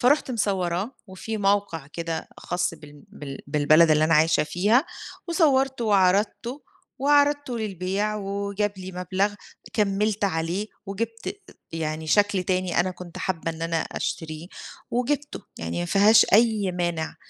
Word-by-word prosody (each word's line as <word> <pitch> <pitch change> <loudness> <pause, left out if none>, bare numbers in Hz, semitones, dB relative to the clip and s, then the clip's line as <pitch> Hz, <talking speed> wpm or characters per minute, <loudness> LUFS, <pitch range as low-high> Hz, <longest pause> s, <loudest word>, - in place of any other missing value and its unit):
فرُحت 270 +2 +3
مصوراه، 195 -1 -1
وفي 190 +4 -6
موقع 200 -7 0
كده 165 +1 -5
خاص 175 -1 -2
بال 150 -2 -14
بال 140 -2 -8
بالبلد 155 +3 +5
اللي 155 0 +4
أنا 165 0 +3
عايشة 155 0 +4
فيها، 210 - +2 0.4
وصَوّرتُه 270 -7 +2
وعرضتُه، 205 +6 +1 0.4
وعرضتُه 285 -2 +2
للبيع، 200 0 -2
وجاب 200 0 -2
لي 185 0 -7
مبلغ 185 +3 -1 0.4
كَمِّلت 210 0 +1
عليه، 175 +2 -1 0.2
وجِبت 225 +3 -4 0.4
يعني 160 -1 -3
شكل 205 +2 +3
تاني 185 -1 0
أنا 185 +1 0
كنت 180 -1 -10
حابة 165 -3 -2
إن 165 0 -8
أنا 165 0 -1
أشتريه، 160 0 -4 0.4
وجِبتُه. 285 +3 -1 0.2
يعني 85 +1 -3
ما - - -1
فيهاش 210 - +6
أي 215 -3 +4
مانع، 175 -3 -2
190 Hz, 130 wpm, -25 LUFS, 165-215 Hz, 0.4 s, فيهاش